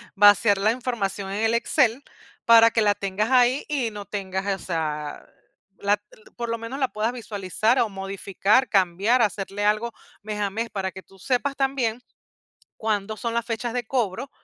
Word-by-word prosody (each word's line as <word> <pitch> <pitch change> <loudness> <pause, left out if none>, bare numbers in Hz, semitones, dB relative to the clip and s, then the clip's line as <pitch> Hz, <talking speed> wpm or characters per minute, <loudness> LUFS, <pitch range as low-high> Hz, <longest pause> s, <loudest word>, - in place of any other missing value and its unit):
Vaciar 205 0 +6
la 210 +3 +2
información 225 -6 -3
en 205 +3 -2
el 225 +1 +2
Excel 245 +1 +2 0.4
para 230 0 +7
que 225 - +2
la 205 -1 +3
tengas 200 +3 -2
ahí 255 +1 +4
y 270 -7 -1
no 205 -1 -8
tengas, 190 -1 -4 0.2
o - - -11
sea, 150 -4 -3 0.5
la 205 +1 +1 0.4
por 235 -1 -3
lo 230 - -1
menos 230 +4 -6
la 265 -2 +1
puedas 215 +2 0
visualizar 220 0 -1
o 230 - +2
modificar, 195 +4 0
cambiar, 195 +6 +2
hacerle 205 -1 -1
algo 215 +3 +1 0.3
mes 210 0 -5
a 205 -1 0
mes, 225 +4 -3
para 190 -1 -3
que 190 - -11
tú 195 -1 -21
sepas 275 +5 -1
también 260 -4 -1 0.8
cuándo 215 -1 -2
son 230 +1 -3
las 235 0 -1
fechas 230 0 -3
de 245 -2 -3
cobro. 240 +1 -2
215 Hz, 175 wpm, -24 LUFS, 195-235 Hz, 0.8 s, para